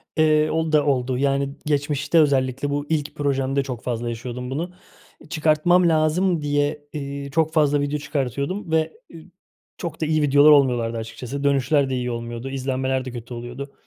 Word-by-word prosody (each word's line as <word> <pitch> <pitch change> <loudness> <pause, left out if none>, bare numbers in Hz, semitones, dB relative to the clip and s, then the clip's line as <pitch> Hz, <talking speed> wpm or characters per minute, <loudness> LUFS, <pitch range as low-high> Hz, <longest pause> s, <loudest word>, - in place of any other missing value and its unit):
Eee, 155 -1 +3
o 160 0 0
da 150 -1 +3
oldu 130 -3 0
yani 140 0 +1 0.2
geçmişte 145 +1 +1
özellikle 135 -2 +2
bu 145 0 -2
ilk 150 -2 -1
projemde 140 -1 0
çok 125 -4 -6
fazla 120 -1 -2
yaşıyordum 125 +2 -5
bunu. 165 +6 -3 0.5
Eee, - - -16
çıkartmam 165 +2 +3
lazım 160 +2 +2
diye, 145 0 0
eee, 140 -1 -5
çok 160 +1 +1
fazla 145 -2 +3
video 145 +1 -1
çıkartıyordum 145 - -3
ve, 160 0 +1 0.2
eee, 165 -1 -12 0.5
çok 170 -3 -6
da - - +1
iyi 155 0 +1
videolar 145 +1 +6
olmuyorlardı 120 -5 +3
açıkçası. 125 +5 -6
Dönüşler 140 0 +2
de 130 - -1
iyi 125 -1 -2
olmuyordu, 120 +2 -5
izlenmeler 130 -1 -2
de 130 - -5
kötü 120 0 -8
oluyordu. 120 +4 -7
140 Hz, 170 wpm, -23 LUFS, 130-155 Hz, 0.5 s, videolar